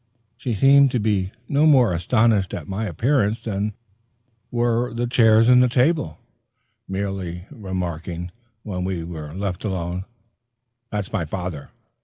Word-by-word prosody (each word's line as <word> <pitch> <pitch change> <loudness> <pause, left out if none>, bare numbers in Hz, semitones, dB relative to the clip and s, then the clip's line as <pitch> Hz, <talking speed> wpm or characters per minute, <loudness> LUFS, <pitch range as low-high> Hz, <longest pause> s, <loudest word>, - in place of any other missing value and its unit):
She 120 -1 -3
seemed 140 +5 +6
to 125 - +2
be 100 -3 0 0.2
no 145 +2 +3
more 125 - +5
astonished 105 +2 +2
at - - -7
my 100 +3 -3
appearance 115 - 0
than 105 -1 -2 0.7
were 120 0 0
the 120 +1 -1
chairs 115 -2 +4
and 125 0 +5
table, 125 - +1 0.7
merely 95 -3 -4
remarking, 90 - -5 0.3
when 90 -4 -4
we 90 -3 -2
were 80 -2 -7
left 95 -2 -3
alone, 90 -2 -3 0.8
"That's 105 -2 -4
my 95 -7 0
father. 90 -2 -5
100 Hz, 130 wpm, -22 LUFS, 90-120 Hz, 0.8 s, seemed